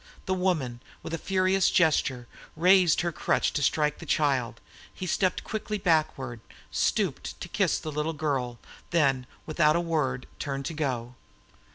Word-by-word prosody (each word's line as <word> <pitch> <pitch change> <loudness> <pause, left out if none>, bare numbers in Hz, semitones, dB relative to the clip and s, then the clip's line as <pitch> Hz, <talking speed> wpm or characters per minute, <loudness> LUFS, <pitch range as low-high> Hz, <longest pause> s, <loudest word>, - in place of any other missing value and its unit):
The 190 - 0
woman, 160 -11 -1 0.2
with 165 - -6
a 165 - -2
furious 190 0 +2
gesture, 145 -8 +2 0.3
raised 180 0 +5
her 170 0 -1
crutch - - 0
to 150 - -1
strike 150 +1 +1
the 165 - -8
child; 135 -7 +1 0.3
he 185 - -6
stepped 185 +1 0
quickly 215 -1 -3
backward, 155 - 0 0.3
stooped - - -1
to - - -6
kiss - - +1
the 155 - -5
little 150 +2 -1
girl, 135 -6 -2 0.3
then, 135 -6 +2 0.2
without 155 -1 +3
a - - +3
word, 150 -7 -1
turned 140 -2 -3
to 165 - -3
go. 125 -6 -2
155 Hz, 155 wpm, -27 LUFS, 135-175 Hz, 0.3 s, raised